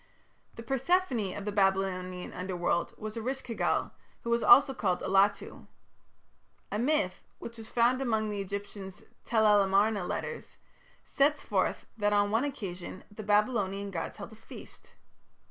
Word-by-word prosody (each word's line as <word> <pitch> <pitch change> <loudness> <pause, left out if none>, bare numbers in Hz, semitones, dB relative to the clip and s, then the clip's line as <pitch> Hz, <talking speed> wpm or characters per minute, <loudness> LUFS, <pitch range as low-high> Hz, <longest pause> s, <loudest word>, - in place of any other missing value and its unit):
The 230 - -8
Persephone 265 - 0
of 200 - -6
the 210 - -2
Babylonian 190 -2 0
Underworld 180 -2 -2
was 215 +1 -6
Eresh 260 +4 -3
ki 235 - -6
gal, - - 0 0.3
who 235 - -2
was 235 0 +2
also 275 0 +7
called 180 -7 -1
Allatu. 195 +1 +1 1.0
A 210 - -1
myth, 240 -8 0 0.2
which 230 0 -9
was 220 - -9
found 245 +2 +2
among 220 -4 0
the 205 -1 -3
Egyptian 200 0 -6 0.3
Tel 220 -2 +2
el 210 -1 +6
Amarna 200 +1 +2
"Letters", 470 - -5 0.5
sets 285 +1 +1
forth - - -1
that 205 0 +2
on 205 0 +2
one 225 +5 +2
occasion 185 -9 -6
the 205 - -8
Babylonian 205 -2 +1
gods 165 -3 -5
held 205 +1 -8
a - - -12
feast. 215 - -13
210 Hz, 150 wpm, -30 LUFS, 195-235 Hz, 1.0 s, also